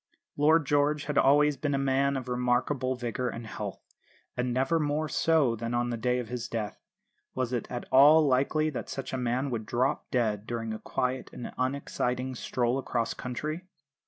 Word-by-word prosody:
Lord 155 Hz, +2 st, +4 dB
George 145 Hz, +1 st, +2 dB
had 150 Hz, -1 st, +1 dB
always 145 Hz, +1 st, +4 dB
been 145 Hz, -2 st, -1 dB
a -, -, +1 dB
man 135 Hz, 0 st, +1 dB
of 130 Hz, -1 st, -6 dB
remarkable 125 Hz, +2 st, 0 dB
vigour 125 Hz, 0 st, -2 dB
and 115 Hz, 0 st, -6 dB
health, 105 Hz, -2 st, -6 dB, 0.6 s
and 125 Hz, 0 st, -1 dB
never 135 Hz, +6 st, +1 dB
more 150 Hz, +1 st, 0 dB
so 150 Hz, -4 st, +2 dB
than 115 Hz, +1 st, -3 dB
on 120 Hz, 0 st, 0 dB
the -, -, -1 dB
day 125 Hz, +2 st, 0 dB
of 125 Hz, -2 st, -3 dB
his 120 Hz, 0 st, -4 dB
death. 110 Hz, -3 st, -4 dB, 0.5 s
Was 130 Hz, -1 st, -1 dB
it 120 Hz, -, -2 dB
at 120 Hz, -1 st, -5 dB
all 150 Hz, +4 st, +7 dB
likely 145 Hz, +4 st, +2 dB
that 130 Hz, -, -5 dB
such 135 Hz, -1 st, -5 dB
a -, -, +1 dB
man 125 Hz, +2 st, -1 dB
would 110 Hz, -3 st, -3 dB
drop 130 Hz, +6 st, 0 dB
dead 110 Hz, -4 st, 0 dB
during 115 Hz, -2 st, -3 dB
a 110 Hz, -, -5 dB
quiet 130 Hz, 0 st, -2 dB
and 120 Hz, -, -7 dB
unexciting 130 Hz, -1 st, -2 dB
stroll 125 Hz, +1 st, -1 dB
across 115 Hz, -3 st, -1 dB
country? 155 Hz, +8 st, -5 dB
130 Hz, 185 wpm, -29 LUFS, 120-145 Hz, 0.6 s, all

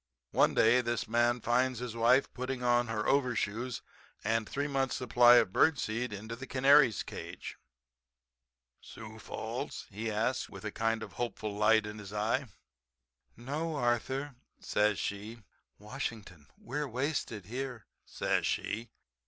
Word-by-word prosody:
One -, -, +3 dB
day 120 Hz, +3 st, +5 dB
this 120 Hz, -1 st, -2 dB
man 120 Hz, +1 st, +2 dB
finds 125 Hz, +2 st, +1 dB
his 120 Hz, -1 st, -5 dB
wife 120 Hz, +4 st, +3 dB
putting 130 Hz, 0 st, -4 dB
on 120 Hz, 0 st, +3 dB
her 110 Hz, -1 st, -2 dB
overshoes 125 Hz, -3 st, 0 dB, 0.4 s
and 110 Hz, +1 st, 0 dB
three 140 Hz, +1 st, -2 dB
months 135 Hz, -2 st, 0 dB
supply 120 Hz, -1 st, +6 dB
of 115 Hz, -6 st, +4 dB
bird 160 Hz, -3 st, +4 dB
seed 115 Hz, +1 st, -2 dB
into 110 Hz, +3 st, -6 dB
the 130 Hz, +3 st, -9 dB
canary's 135 Hz, -2 st, +5 dB
cage. -, -, -7 dB, 1.3 s
"Sioux -, -, -11 dB
Falls?" -, -, -5 dB
he 110 Hz, +3 st, -3 dB
asks 115 Hz, +4 st, -1 dB
with 95 Hz, +2 st, -10 dB
a 105 Hz, -, -2 dB
kind 115 Hz, 0 st, 0 dB
of 100 Hz, -4 st, -9 dB
hopeful 110 Hz, -3 st, -4 dB
light 110 Hz, +1 st, +4 dB
in 105 Hz, 0 st, -7 dB
his 100 Hz, -2 st, -9 dB
eye. 115 Hz, +6 st, 0 dB, 0.9 s
"No, 150 Hz, +7 st, -3 dB
Arthur," 130 Hz, +2 st, -1 dB, 0.3 s
says 105 Hz, -1 st, +1 dB
she, 105 Hz, +3 st, -5 dB, 0.3 s
"Washington. 105 Hz, -, -6 dB
We're 145 Hz, +4 st, -4 dB
wasted 125 Hz, -, -2 dB
here," 125 Hz, -1 st, -5 dB, 0.2 s
says -, -, -1 dB
she. 115 Hz, +2 st, -2 dB
120 Hz, 140 wpm, -31 LUFS, 110-130 Hz, 1.3 s, supply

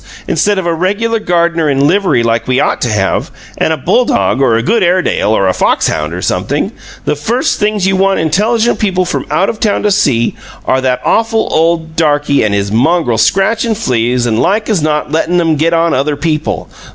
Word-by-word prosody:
Instead 205 Hz, -1 st, +1 dB
of 190 Hz, -, -2 dB
a 170 Hz, -, 0 dB
regular 205 Hz, +7 st, -1 dB
gardener 170 Hz, -4 st, 0 dB
in 140 Hz, 0 st, +1 dB
livery 180 Hz, -6 st, +2 dB
like 115 Hz, 0 st, -1 dB
we 130 Hz, 0 st, +1 dB
ought -, -, 0 dB
to 120 Hz, -, 0 dB
have, 100 Hz, -3 st, -1 dB, 0.3 s
and -, -, +1 dB
a 160 Hz, -, 0 dB
bulldog 245 Hz, -, +1 dB
or 125 Hz, -4 st, +3 dB
a 115 Hz, -, 0 dB
good 230 Hz, +5 st, +1 dB
Airedale 180 Hz, -, +1 dB
or 100 Hz, -3 st, +2 dB
a 95 Hz, -, +2 dB
fox -, -, +1 dB
hound, 75 Hz, 0 st, -3 dB
or 90 Hz, +2 st, -5 dB
something, -, -, -1 dB, 0.3 s
the -, -, 0 dB
first 230 Hz, -, -1 dB
things 210 Hz, -2 st, 0 dB
you 190 Hz, 0 st, +1 dB
want 195 Hz, +1 st, +1 dB
intelligent 215 Hz, +9 st, +1 dB
people 185 Hz, -3 st, 0 dB
from 180 Hz, -, -3 dB
out 195 Hz, -, +1 dB
of 220 Hz, -, -4 dB
town 210 Hz, -2 st, 0 dB
to 210 Hz, -, +2 dB
see 120 Hz, -, +1 dB, 0.3 s
are 130 Hz, -, +1 dB
that 125 Hz, -1 st, -1 dB
awful 225 Hz, 0 st, +1 dB
old 160 Hz, 0 st, 0 dB
darky 145 Hz, -3 st, +1 dB
and 105 Hz, -2 st, 0 dB
his 100 Hz, 0 st, -2 dB
mongrel 125 Hz, 0 st, +1 dB
scratchin' 220 Hz, -, +1 dB
fleas 125 Hz, -, 0 dB
and 115 Hz, -1 st, 0 dB
like 215 Hz, +3 st, 0 dB
as 195 Hz, -7 st, +1 dB
not 150 Hz, 0 st, -1 dB
lettin' 165 Hz, +2 st, +1 dB
'em 165 Hz, -2 st, +1 dB
get 160 Hz, +3 st, +1 dB
on 165 Hz, 0 st, +1 dB
other 145 Hz, +3 st, 0 dB
people! 155 Hz, +1 st, -2 dB
165 Hz, 205 wpm, -12 LUFS, 130-195 Hz, 0.3 s, or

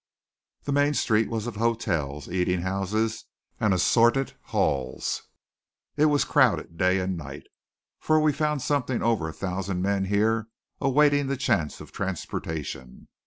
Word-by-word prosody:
The 145 Hz, -, -3 dB
main 145 Hz, +1 st, +2 dB
street 110 Hz, -3 st, +2 dB
was 115 Hz, -1 st, -3 dB
of 120 Hz, -3 st, -5 dB
hotels, 85 Hz, -, -1 dB
eating 90 Hz, -1 st, 0 dB
houses, 100 Hz, +4 st, -1 dB, 0.3 s
and 105 Hz, -, +2 dB
assorted 120 Hz, +8 st, +3 dB
hells. 65 Hz, -2 st, -1 dB, 0.7 s
It 150 Hz, -, +3 dB
was 145 Hz, -2 st, +3 dB
crowded 85 Hz, -, +2 dB
day 90 Hz, +3 st, +2 dB
and 95 Hz, 0 st, -1 dB
night, 70 Hz, -5 st, -8 dB, 0.5 s
for 155 Hz, 0 st, +3 dB
we 155 Hz, -1 st, +3 dB
found 150 Hz, -1 st, -1 dB
something 135 Hz, -4 st, 0 dB
over 110 Hz, -9 st, +1 dB
a -, -, -7 dB
thousand 95 Hz, -1 st, -3 dB
men 100 Hz, 0 st, +1 dB
here 110 Hz, +3 st, +1 dB, 0.3 s
awaiting 145 Hz, +1 st, +3 dB
the 135 Hz, 0 st, -1 dB
chance 80 Hz, -, 0 dB
of -, -, -11 dB
transportation. 80 Hz, -8 st, -5 dB
105 Hz, 140 wpm, -26 LUFS, 90-130 Hz, 0.7 s, assorted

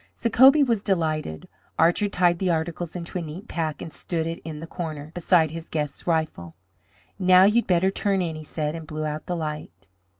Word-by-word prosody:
Sacobie 265 Hz, +5 st, +6 dB
was 230 Hz, -5 st, 0 dB
delighted. 155 Hz, -, -1 dB, 0.3 s
Archer 175 Hz, +5 st, +3 dB
tied 175 Hz, -3 st, +2 dB
the 190 Hz, -, 0 dB
articles 165 Hz, +1 st, -2 dB
into 175 Hz, +1 st, -4 dB
a -, -, -4 dB
neat 165 Hz, +7 st, -8 dB
pack 160 Hz, -3 st, -3 dB
and 160 Hz, -, -9 dB
stood 165 Hz, -2 st, -3 dB
it 165 Hz, 0 st, -5 dB
in 160 Hz, -2 st, -6 dB
the 165 Hz, -, -7 dB
corner, 155 Hz, -3 st, -6 dB
beside 170 Hz, -3 st, +2 dB
his 165 Hz, 0 st, -8 dB
guest's 150 Hz, 0 st, -4 dB
rifle. 155 Hz, -, -1 dB, 0.6 s
"Now 185 Hz, 0 st, +6 dB
you 210 Hz, +4 st, +4 dB
had -, -, -17 dB
better 185 Hz, +1 st, +3 dB
turn 200 Hz, -1 st, 0 dB
in," 170 Hz, -3 st, -2 dB
he 155 Hz, -, -8 dB
said, 150 Hz, 0 st, -3 dB
and 165 Hz, -1 st, -7 dB
blew 155 Hz, 0 st, -4 dB
out 155 Hz, 0 st, -4 dB
the 180 Hz, -, -1 dB
light. 150 Hz, -, -6 dB
165 Hz, 200 wpm, -24 LUFS, 155-180 Hz, 0.6 s, Sacobie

